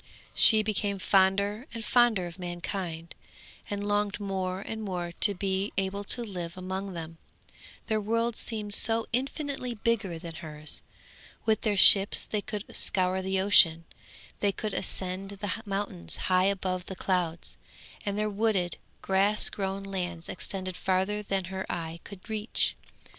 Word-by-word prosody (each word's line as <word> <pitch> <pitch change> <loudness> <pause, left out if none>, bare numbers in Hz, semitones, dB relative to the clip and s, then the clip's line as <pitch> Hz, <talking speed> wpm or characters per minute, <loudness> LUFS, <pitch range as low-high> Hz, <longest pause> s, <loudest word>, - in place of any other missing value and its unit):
She 220 -1 +6
became 205 -1 -1
fonder 200 +5 +2
and 225 -1 -5
fonder 235 -6 +4
of 175 +1 -9
mankind, 175 -1 -4 0.6
and 205 0 -3
longed 205 0 0
more 190 -2 -2
and 220 +2 -5
more 180 -4 -3
to 205 -1 +3
be 195 +1 -1
able 195 +1 -1
to 240 - +2
live 180 -4 -6
among 190 +1 -4
them; 165 -1 -7 0.7
their 215 -1 0
world 230 +2 0
seemed 210 -3 -3
so 225 +2 +3
infinitely 270 -1 -2
bigger 210 -5 0
than 165 0 -8
hers; 155 -1 -3 0.6
with 220 -1 +2
their 210 -2 +1
ships 195 +1 +8
they 210 - -2
could 210 0 -4
scour 185 0 +1
the 190 0 0
ocean, 170 -4 +5 0.5
they 205 - +2
could 210 +1 -4
ascend 185 +1 -2
the 205 +2 -1
mountains 195 - -3
high 185 0 +3
above 185 -2 -1
the 190 - -5
clouds, 175 -3 -1 0.5
and 200 0 -2
their 215 0 +1
wooded, 205 -4 0 0.3
grass 195 +2 +3
grown 195 0 -3
lands 180 -4 -4
extended 185 0 -4
further 190 +3 0
than 195 -2 -1
her 190 0 -2
eye 165 0 -4
could 200 -1 -11
reach. 220 0 0
195 Hz, 150 wpm, -29 LUFS, 185-210 Hz, 0.7 s, ships